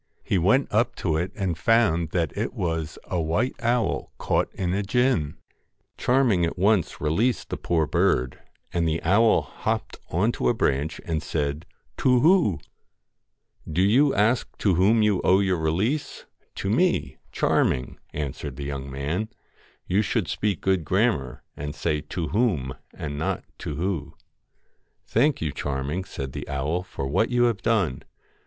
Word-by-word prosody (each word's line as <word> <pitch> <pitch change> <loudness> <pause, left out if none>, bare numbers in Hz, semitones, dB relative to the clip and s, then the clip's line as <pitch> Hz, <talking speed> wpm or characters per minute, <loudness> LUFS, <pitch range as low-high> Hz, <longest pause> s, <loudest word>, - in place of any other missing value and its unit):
He 95 - +1
went 105 +11 +3
up 115 +2 +2
to 80 -4 -1
it 85 +4 -1
and 95 -5 -1
found 85 -4 +2
that 85 -3 -1
it - - -3
was 80 -2 -2
a 90 -2 -2
white 85 +11 0
owl 120 0 0
caught - - 0
in 90 -2 -1
a 100 - 0
gin. 105 - +1 0.6
Charming 125 -8 +2
at 85 - -1
once 100 -1 +2
released 105 - 0
the - - -2
poor 80 -2 +1
bird, 65 -3 +1 0.3
and 85 -1 +1
the 80 0 0
owl 100 +7 +4
hopped - - -3
on 100 +8 +2
to - - 0
a 120 - +2
branch, 75 -4 0
and 80 -2 -1
said, 75 0 -2
' - - -43
To 125 -1 +4
whoo! 170 - +5
' 75 -4 -17
172 - - -11
1 - - -5
Do 90 - +3
you 135 +8 +4
ask 110 +4 +1
to 100 - +2
whom 105 +6 +4
you 105 -3 +2
owe 95 +1 +5
your 95 -3 +1
release? 95 - -1 0.3
To 95 - -2
me, 180 +12 +4
THE - - -10
FAIR - - -21
Charming,' 65 - +1
answered 70 -1 -5
the 70 - -6
young 70 -1 -5
man: 75 +11 -2 0.3
* - - -32
you 95 +3 +2
should 110 +1 0
MAID 80 - -10
speak 105 -5 -1
good 95 -3 +1
grammar, 90 - 0
and 75 0 -5
say 75 -1 -1
To 80 -1 -4
whom 95 - 0 0.2
and 70 -2 -5
not - - -2
GOLDEN - - -36
To 75 - -4
who.' 90 +2 -1
LOCKS - - -34 0.9
'Thank 140 +5 +2
you, 80 -3 -1
Charming,' 70 +7 -3
said 65 -7 -6
the - - -7
owl, 70 +6 -1
'for 90 -6 -6
what 95 +11 +1
you 125 -1 +2
have 115 -5 +1
done. 95 - +1
90 Hz, 180 wpm, -25 LUFS, 75-110 Hz, 0.9 s, whoo